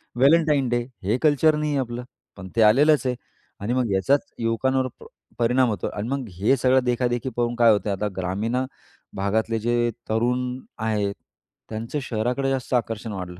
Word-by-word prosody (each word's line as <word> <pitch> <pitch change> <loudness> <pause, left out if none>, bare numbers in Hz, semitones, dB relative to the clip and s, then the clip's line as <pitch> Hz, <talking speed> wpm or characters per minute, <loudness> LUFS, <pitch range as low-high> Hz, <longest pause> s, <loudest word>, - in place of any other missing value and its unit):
Valentine 145 +1 +4
day, 120 - +2 0.3
हे 105 +6 +1
culture 155 +1 +4
नाहीये 150 -1 -1
आपलं. 120 -1 -4 0.3
पण 95 -1 -8
ते 115 - +3
आलेलंच 140 +7 +5
आहे 125 - 0 0.5
आणि 115 +5 -1
मग 125 -4 0
याचाच 135 +9 +3 0.2
युवकांवर 130 +3 +1
प - - -13 0.3
परिणाम 125 +1 +3
होतो 105 - -2
आणि 105 - -3
मग 135 -3 -2
हे 100 +9 +2
सगळं 130 +1 +3
देखा-देखी 120 +1 0
पाहून 120 0 0
काय 115 -2 +6
होतंय 105 0 +1
आता 105 +2 -2
ग्रामीण 95 +6 -2
अ, 130 - +1 0.5
भागातले 110 +3 0
जे 120 +1 +1 0.2
तरुण 120 +3 +1 0.4
आहेत, 105 -2 -1 0.5
त्यांचं 115 +6 -4
शहराकडे 125 +4 -1
जास्त 130 -1 -3
आकर्षण 115 -1 -2
वाढलं 90 -2 -7
120 Hz, 165 wpm, -24 LUFS, 110-130 Hz, 0.5 s, काय